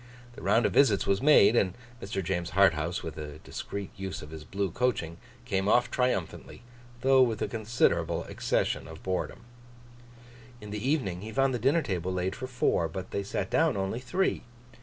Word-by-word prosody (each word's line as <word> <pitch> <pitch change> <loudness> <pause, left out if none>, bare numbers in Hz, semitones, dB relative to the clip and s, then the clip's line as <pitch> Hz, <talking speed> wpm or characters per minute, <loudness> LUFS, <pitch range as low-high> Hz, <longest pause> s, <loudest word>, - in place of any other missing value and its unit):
The - - -11
round 115 - +3
of - - +1
visits 110 -9 +4
was 100 0 +1
made; 135 -6 +6
and 95 -5 +2 0.3
Mr. 95 0 -3
James 85 -1 -2
Harthouse, 85 -3 +2
with 80 -1 -6
a 75 -1 -7
discreet 100 -1 -6
use 95 -3 -5
of 75 - -11
his 80 -1 -8
blue 95 +3 -2
coaching, 85 -8 -1 0.3
came 95 0 -1
off 120 +2 +3
triumphantly, 125 -4 -2 0.4
though 135 0 +5
with 115 -4 +2
a - - 0
considerable 115 +1 0
accession - - -1
of 80 0 -11
boredom. 95 -1 -3 1.2
In 105 -2 -9
the 105 +5 -2
evening, 100 - 0
he 110 +2 -7
found 135 +3 +2
the 125 - -1
dinner 140 +8 +2
table 90 -2 -2
laid 90 +1 -2
for 130 +2 -6
four, 125 -9 +1
but 95 +3 -7
they 100 - -1
sat 100 - -3
down - - +2
only 95 +4 -2
three. 180 +10 0
100 Hz, 180 wpm, -29 LUFS, 90-125 Hz, 1.2 s, made